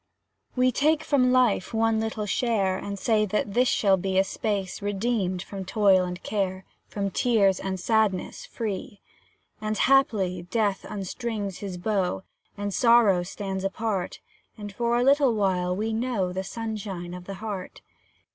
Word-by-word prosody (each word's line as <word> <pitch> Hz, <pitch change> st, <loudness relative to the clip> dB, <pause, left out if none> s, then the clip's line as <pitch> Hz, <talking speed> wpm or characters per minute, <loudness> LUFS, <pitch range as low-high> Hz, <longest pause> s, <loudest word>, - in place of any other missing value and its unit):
We 255 Hz, 0 st, +3 dB
take 305 Hz, +5 st, +2 dB
from 255 Hz, -3 st, +3 dB
life 245 Hz, -4 st, +2 dB
one 225 Hz, 0 st, +2 dB
little 220 Hz, -1 st, -2 dB
share, 205 Hz, -3 st, +1 dB
And 200 Hz, +1 st, -5 dB
say 215 Hz, +1 st, +2 dB
that 205 Hz, 0 st, -1 dB
this 250 Hz, +3 st, +3 dB
shall 195 Hz, -5 st, +3 dB
be 190 Hz, +1 st, -1 dB
A 190 Hz, -, +5 dB
space, 195 Hz, -1 st, -3 dB
redeemed 200 Hz, -3 st, -1 dB
from 195 Hz, -1 st, -7 dB
toil 195 Hz, -2 st, +3 dB
and 180 Hz, 0 st, -6 dB
care, 190 Hz, -2 st, -2 dB, 0.2 s
From 200 Hz, -1 st, -3 dB
tears 200 Hz, -6 st, +3 dB
and 190 Hz, -1 st, -3 dB
sadness 215 Hz, -2 st, 0 dB
free. 205 Hz, -3 st, -5 dB, 0.6 s
And, 215 Hz, 0 st, -2 dB
haply, 200 Hz, -10 st, +2 dB
Death 205 Hz, -1 st, 0 dB
unstrings 205 Hz, 0 st, -4 dB
his 195 Hz, -3 st, -5 dB
bow, 190 Hz, -1 st, -1 dB, 0.3 s
And 205 Hz, 0 st, -3 dB
Sorrow 230 Hz, -6 st, +5 dB
stands 190 Hz, +1 st, -5 dB
apart, 195 Hz, -1 st, -2 dB, 0.4 s
And, 205 Hz, -1 st, -7 dB
for 235 Hz, +3 st, 0 dB
a 245 Hz, -, +2 dB
little 275 Hz, -2 st, +4 dB
while, 180 Hz, -3 st, +1 dB
we 220 Hz, +3 st, -2 dB
know 220 Hz, -6 st, -1 dB
The 190 Hz, +1 st, -3 dB
sunshine 195 Hz, -4 st, -5 dB
of 180 Hz, 0 st, -8 dB
the 195 Hz, -, -6 dB
heart. 200 Hz, -2 st, -6 dB
205 Hz, 155 wpm, -26 LUFS, 190-225 Hz, 0.6 s, A